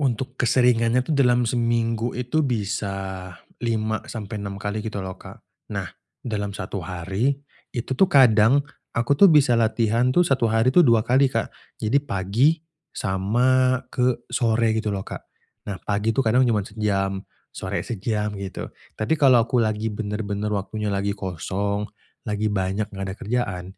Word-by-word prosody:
Untuk 130 -1 -2
keseringannya 120 0 +3
itu 130 - -7
dalam 125 -3 +3
seminggu 115 -1 0
itu 125 +5 0
bisa 95 -5 -3 0.2
5 110 -2 -1
sampai 105 -2 -6
6 100 -1 -5
kali 105 +2 -3
gitu 105 -3 -4
loh 95 0 -7
Kak. - - -13 0.3
Nah, - - -3 0.3
dalam 105 -4 -3
1 95 +1 -5
hari 95 +9 -1 0.4
itu 120 +2 -4
tuh 195 - +6
kadang 125 -1 +5 0.3
aku 120 +4 +1
tuh 200 - +9
bisa 135 -7 +5
latihan 115 +1 +2
tuh 175 - +5
1 135 -8 +2
hari 115 +3 +3
itu 175 +3 +5
2 115 -2 +5
kali 130 +4 +3
Kak. 130 - -2 0.3
Jadi 115 +6 +3
pagi 115 +1 +1 0.5
sama 125 +6 +2
ke 125 -1 0
sore 115 -2 +2
gitu 110 -1 -2
loh 95 - -3
Kak. - - -7 0.5
Nah 100 - -3
pagi 105 +2 0
tuh 135 - +3
kadang 125 +3 +4
cuma 105 -3 +2
sejam, 100 -3 -1 0.3
sore - - -3
sejam, 105 -1 -2
gitu. 95 -1 -6 0.3
Tapi 110 +9 +1
kalau 130 -4 +6
aku 125 +1 0
lagi 110 0 0
bener-bener 105 -1 -3
waktunya 105 +2 -3
lagi 100 0 0
kosong, 100 +3 -2 0.4
lagi 105 0 -1
banyak 100 +1 -1
enggak 95 0 -4
ada - - -7
kerjaan, 110 -6 -2
110 Hz, 155 wpm, -23 LUFS, 100-125 Hz, 0.5 s, tuh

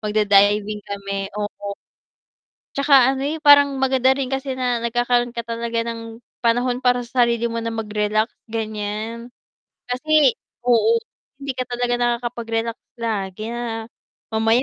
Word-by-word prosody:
magda-diving 210 0 +3
kami, 200 -1 -4
oo. 205 -1 -5 0.9
Tsaka 275 -2 +5
ano 265 - -4
eh, 315 +2 -3
parang 285 -1 +7
maganda 265 0 +3
rin 270 -1 -3
kasi 270 0 -2
na 250 -2 0
nagkakaroon 240 +1 0
ka 235 - -3
talaga 230 0 -2
ng 230 0 -8 0.2
panahon 245 +1 +1
para 245 -1 +2
sa 240 0 +2
sarili 235 0 0
mo 230 - -3
na 230 0 -3
mag-relax, 215 0 0 0.2
ganyan. 220 +1 -4 0.6
Kasi 295 +1 +3 0.3
oo, 345 - +4 0.4
hindi 275 -1 -2
ka 255 - 0
talaga 245 0 -1
nakakapag-relax 235 -1 -1 0.2
lagi 215 -1 -3
na 230 -2 -4 0.5
mamaya 225 +3 +3
235 Hz, 130 wpm, -21 LUFS, 220-250 Hz, 0.9 s, parang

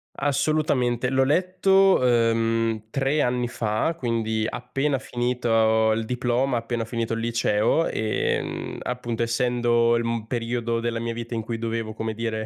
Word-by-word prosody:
Assolutamente! 135 -4 +1
L'ho 135 0 +3
letto, 185 +4 +3
ehm, 115 -2 +1
3 135 +4 0
anni 125 -1 0
fa, 115 +7 -1
quindi 110 -4 -1
appena 135 +4 -2
finito 115 -3 +1
il 115 +1 -1
diploma, 125 +2 0
appena 115 0 -2
finito 115 0 -3
il 115 - -2
liceo. 115 +5 +1
Ehm, 110 -1 -2
appunto 120 -2 -3
essendo 120 -1 +2
il, 120 - 0
mhmm, 115 -1 -2
periodo 115 -1 -2
della 115 0 -2
mia 115 0 -3
vita 115 +1 -6
in 115 - -1
cui 115 +1 -4
dovevo, 115 -1 -3
come 110 0 -3
dire, 110 -1 -3
115 Hz, 145 wpm, -24 LUFS, 115-125 Hz, -, L'ho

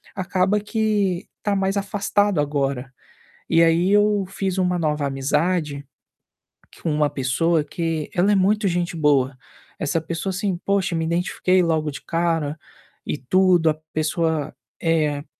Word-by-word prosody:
acaba 190 +2 +1
que 210 -4 0 0.2
tá 205 -1 +1
mais 195 +1 0
afastado 200 -2 +1
agora. 140 -3 -2 0.6
E 165 - +4
aí 170 +3 +3
eu 205 -1 +3
fiz 195 -1 -3
uma 180 -1 +1
nova 150 -2 0
amizade, 145 +2 -1 1.0
com 165 - -2
uma 150 -1 +1
pessoa 150 +5 +1
que 160 0 -3
ela 185 +3 +3
é - - +4
muito 200 +2 +2
gente 175 0 -1
boa, 140 -4 +2 0.4
essa 160 +1 0
pessoa, 165 +4 -4
assim, 190 -1 -1
poxa, 195 -3 +1
me 165 -1 0
identifiquei 180 +2 +1
logo 155 -2 0
de 140 - -8
cara 165 -3 -1 0.5
e 150 - -2
tudo, 175 +3 +3
a - - -1 0.2
pessoa, 155 -1 -1 0.3
eh, 155 -3 +1
170 Hz, 140 wpm, -22 LUFS, 150-190 Hz, 1.0 s, E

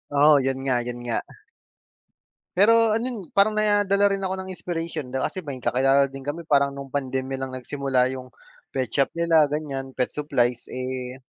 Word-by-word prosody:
Oo 145 +1 +6
yun 135 0 -1
nga 130 -2 +1
yun 120 0 -5
nga. 120 -1 0 1.4
Pero 225 +3 +5
ano 225 +2 -1
n 250 -2 -4 0.2
parang 200 +2 +5
nadala 205 -1 +3
rin 195 0 -3
ako 190 0 -1
ng 190 0 -6
inspiration 165 -6 -5
di 135 - -2
ba - - +1
kasi 185 - -7
may 140 -4 -6
kakilala 135 +3 +3
din 135 0 -10
kami 155 +4 -5
parang 140 -1 +3
nung 140 -1 -8
pandemya 135 -1 -2
lang 135 0 -4
nagsimula 130 0 0
yung 130 -1 -8 0.4
pet 130 -2 -1
shop 140 -1 +2
nila 165 -3 +4
ganyan, 140 -3 -3
pet 125 - 0
supplies, 125 -5 0
eh 130 0 -4
140 Hz, 180 wpm, -24 LUFS, 130-170 Hz, 1.4 s, Oo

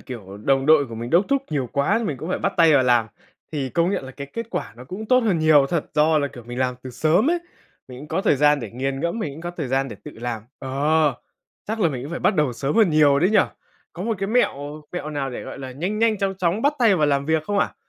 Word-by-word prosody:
kiểu 100 -6 -9
đồng 135 0 +2
đội 155 -3 +5
của 115 - -8
mình 115 +2 -6
đốc 175 +4 +4
thúc 275 -1 +1
nhiều 135 -5 -1
quá, 150 +11 +1
mình 140 - -2
cũng 160 +7 -7
phải - - -1
bắt - - -1
tay 165 -2 +6
vào 135 - +5
làm. 120 -3 +3 0.5
Thì 140 -3 -2
công 170 +6 +1
nhận 170 - -2
là 130 - -8
cái 140 +1 -8
kết 230 -1 -4
quả - - -4
nó 125 - -11
cũng 200 +10 -7
tốt 255 +2 +5
hơn 210 -8 +1
nhiều 155 -3 +5
thật, 170 -4 -1
do 155 +1 +4
là, 145 -1 0
kiểu, 120 -3 -12
mình 120 +1 -6
làm 125 -1 0
từ 130 - -7
sớm 160 - +2
ấy, 350 - +1 0.5
mình 125 -1 -9
cũng 150 - -10
có 190 - -1
thời 145 - +3
gian 145 0 +4
để 115 - -6
nghiền 135 +3 -3
ngẫm, 170 +8 -2
mình 145 -9 -4
cũng 160 - -10
có 175 - -4
thời 160 -7 -5
gian 135 +1 0
để - - -8
tự 150 - -7
làm. 120 -3 -4 0.2
Ờ, 145 +2 +1 0.5
chắc 220 0 -2
là 170 - +4
mình 130 -5 -5
cũng 150 - -7
phải 170 - -4
bắt - - +2
đầu 150 -5 +1
sớm 135 - -2
hơn 215 -7 +5
nhiều 145 -2 +5
đấy 180 +6 +3
nhỉ? 215 - +4 0.5
Có 180 - -7
một 225 -3 -2
cái 195 - -2
mẹo 150 - -1
mẹo 155 -4 -4
nào 140 -3 -3
để, - - -6
gọi - - -8
là, 130 -1 -7
nhanh 180 +11 -3
nhanh, 225 -2 +2
chóng 195 -1 -1
chóng 180 +5 0
bắt 285 - +3
tay 225 -6 +4
vào 150 -3 +2
làm 140 0 +1
việc 160 -1 +1
không 205 +4 -1
ạ? - - 0
150 Hz, 290 wpm, -22 LUFS, 135-180 Hz, 0.5 s, tay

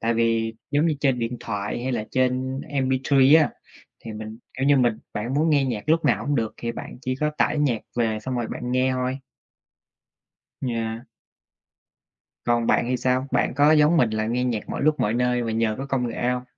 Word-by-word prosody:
Tại 115 +1 +1
vì 115 -1 +1 0.2
giống 145 +3 +2
như 155 - +1
trên 135 -4 +2
điện 115 +1 -2
thoại 105 +2 -4
hay 130 +1 -2
là 110 - -2
trên 130 +1 0
MP3 135 +2 +4
á, - - 0 0.5
thì 115 - -6
mình, 110 +1 -8 0.2
kiểu 135 - +1
như, 145 0 +5
mình 120 -4 +2
bạn 115 +5 -3
muốn 155 +3 +2
nghe 145 -2 +3
nhạc 120 -3 -4
lúc 165 +1 +3
nào - - +2
cũng 145 - +1
được, 115 -4 -1
thì 115 0 -4
bạn 115 - -8
chỉ 130 0 -1
có 150 0 +1
tải 155 - +2
nhạc 130 -7 +1 0.2
về 110 -2 +1
xong 130 +2 -3
rồi 120 - -1
bạn 125 0 -4
nghe 130 +1 +2
thôi. 130 +1 -2 1.4
Yeah. 115 -1 -3 1.4
Còn 120 -1 +1
bạn - - +3
thì 125 - +1
sao? 130 +2 0
Bạn - - +1
có 145 +2 +5
giống 155 +2 +5
mình 120 -7 +4
là 110 0 -1
nghe 125 +2 0
nhạc 120 -4 -2
mọi - - -3
lúc 155 0 +2
mọi 105 - +1
nơi 125 0 +1
vì 115 - -2
nhờ 110 -1 +1
có 135 - -4
công 135 -3 -1
nghệ 120 +1 -2
hông? 125 0 -1
125 Hz, 215 wpm, -24 LUFS, 115-135 Hz, 1.4 s, như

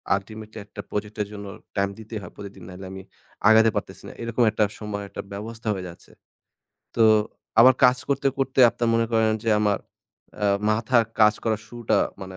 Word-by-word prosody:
ultimately 110 +2 -8
একটা - - -9
project-এর 105 0 -3
জন্য 100 0 -7 0.3
time 100 0 +1
দিতে 110 +1 -12
হয় 85 - -10
প্রতিদিন। 100 -2 -10
নাইলে 95 +1 -9
আমি 95 0 -8 0.5
আগাতে 110 0 +6
পারতেছি - - -5
না। - - -8
এরকম 115 +1 0
একটা 110 - +1 0.2
সময়ের 100 -1 -5
একটা - - -6
ব্যবস্থা 110 +2 -7
হয়ে 95 -2 -5
যাচ্ছে। 85 - -15 0.9
তো 115 - +4 0.6
আবার 130 +2 +8
কাজ 125 0 +6
করতে, 140 0 0
করতে, 135 0 +1
আপনার 120 - -1
মনে 115 0 +2
করেন 110 -1 +3
যে 115 - +2
আমার, 105 -1 +2 0.6
আ - - +2 0.3
মাথার 115 +2 +2 0.2
কাজ 105 0 +6
করার 110 -2 0
শুরুটা 120 -1 0 0.2
মানে 95 0 -8
110 Hz, 175 wpm, -24 LUFS, 100-115 Hz, 0.9 s, আবার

